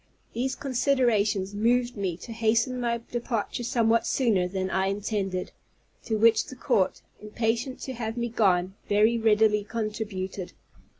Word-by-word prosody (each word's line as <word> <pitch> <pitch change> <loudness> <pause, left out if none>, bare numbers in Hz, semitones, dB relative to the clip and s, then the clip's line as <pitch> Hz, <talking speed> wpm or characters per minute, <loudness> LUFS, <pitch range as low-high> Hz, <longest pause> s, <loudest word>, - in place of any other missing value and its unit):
These 255 +3 -1
considerations 235 -7 +1
moved 240 +4 +1
me 190 -5 -2
to 230 - -10
hasten 230 +3 +1
my 235 -1 -1
departure 240 -1 -2
somewhat 230 -2 +2
sooner 215 -9 +2
than 190 0 -3
I 190 0 +1
intended; 195 -2 -2 0.5
to 220 -2 0
which 225 +1 +4
the 260 - -9
court, 195 -6 0 0.2
impatient 230 +4 -2
to 265 - -5
have 225 -1 -4
me 235 0 -1
gone, 190 -5 +2 0.2
very 215 +3 +3
readily 215 -1 +3
contributed. 210 -4 -4
220 Hz, 135 wpm, -27 LUFS, 200-235 Hz, 0.5 s, which